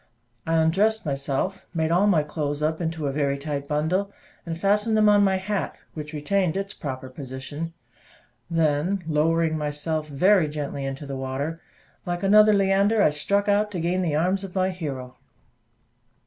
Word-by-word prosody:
I 165 - +2
undressed 195 +7 +2
myself, 140 +7 -2
made 160 0 0
all 185 +4 +4
my 170 -7 +4
clothes 150 -1 -3
up 160 +2 0
into 160 -2 -2
a 140 - 0
very 140 0 0
tight 140 0 -4
bundle, 160 +7 0 0.4
and 165 -1 -3
fastened 210 +3 +2
them 215 0 +5
on 205 -1 +6
my 190 -1 +3
hat, 195 +2 -2 0.2
which 150 -1 -7
retained 175 +4 0
its 195 0 -3
proper 130 -2 -6
position; 135 +5 -6 0.8
then, 165 +3 +1
lowering 160 +1 +2
myself 150 +1 -2
very 175 +4 +3
gently 145 -2 -4
into 135 +2 -5
the 140 -1 -5
water, 135 +5 -4 0.4
like 175 +1 -3
another 210 +2 +6
Leander 200 +2 +3
I - - +4
struck 200 +8 0
out 205 +1 +2
to 180 - -2
gain 175 +3 0
the 165 -5 0
arms 185 +5 +1
of 195 -1 -8
my 185 0 +1
Hero. 135 -8 -6
165 Hz, 165 wpm, -25 LUFS, 145-195 Hz, 0.8 s, on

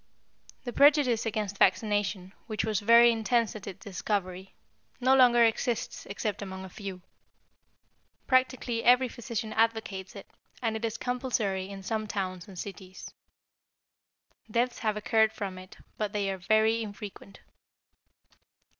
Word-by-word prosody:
The 245 - -5
prejudice 280 -6 +4
against 210 -2 -3
vaccination, 200 -1 +1
which 215 -2 -2
was 215 -3 0
very 235 +3 +7
intense 230 0 0
at 210 -2 -9
its 195 0 -9
discovery, 190 -1 -3 0.4
no 260 +1 +4
longer 245 -2 +6
exists 230 +1 -2
except 205 +1 -3
among 190 -1 -6
a - - -10
few. 190 -2 -8 1.2
Practically 255 -3 +1
every 250 +2 +5
physician 230 -2 -5
advocates 220 -4 -1
it, 200 - -9 0.3
and 225 -2 -1
it 220 - -5
is 230 0 -2
compulsory 230 -7 -2
in 195 -1 -8
some 215 +2 -2
towns 185 -4 -4
and 190 -3 -12
cities. 190 -1 -8 1.4
Deaths 240 +3 0
have 215 -2 -1
occurred 220 +1 +2
from 190 -3 -5
it, 185 +1 -13 0.2
but 210 -1 -2
they 200 -2 0
are 190 - -4
very 220 +4 +2
infrequent. 205 -2 -9
215 Hz, 135 wpm, -29 LUFS, 195-235 Hz, 1.4 s, very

